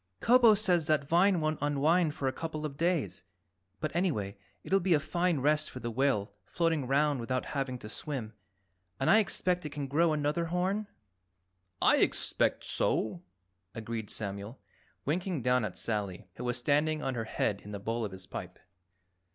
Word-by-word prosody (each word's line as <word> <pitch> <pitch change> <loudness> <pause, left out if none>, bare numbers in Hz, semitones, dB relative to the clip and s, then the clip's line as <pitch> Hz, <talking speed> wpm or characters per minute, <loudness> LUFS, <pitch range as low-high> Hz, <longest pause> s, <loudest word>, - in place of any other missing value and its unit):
"Kobo 235 -2 +6
says 180 -6 +2
that 150 -3 +2
vine 180 +3 +4
won't 155 0 -1
unwind 150 +3 +2
for 135 - -2
a 130 - 0
couple 155 0 -4
of 145 -2 -5
days, 150 - -1 0.6
but 155 +1 -3
anyway 140 - 0 0.3
it'll 195 - +2
be 180 -2 +3
a - - +3
fine 170 0 0
rest 150 +2 +2
for 130 - -8
the 120 -2 -4
whale 115 -5 0
floating 165 -4 0
around 140 +1 +2
without 130 +2 -2
having 135 -3 -2
to 105 - -9
swim. 120 -1 -4 0.7
And 135 - +3
I 220 - +7
expect 180 -4 +1
it 150 - -4
can 145 0 -4
grow 160 +5 +2
another 150 +2 0
horn?" 185 +5 -1 1.0
"I - - +6
expect - - +1
so," 170 +10 -1 0.5
agreed 115 -1 -5
Samuel, 100 +3 -4 0.5
winking 170 -1 -1
down 125 -1 +3
at 105 -4 -4
Sally, 105 -5 -2
who 125 - -7
was 120 0 -1
standing 150 +4 +1
on 135 - -1
her 115 -2 -3
head 105 -2 -1
in 105 - -10
the 100 - -5
bowl 115 +3 -2
of 105 - -3
his 95 0 -9
pipe. 90 0 -7
145 Hz, 175 wpm, -30 LUFS, 115-170 Hz, 1.0 s, I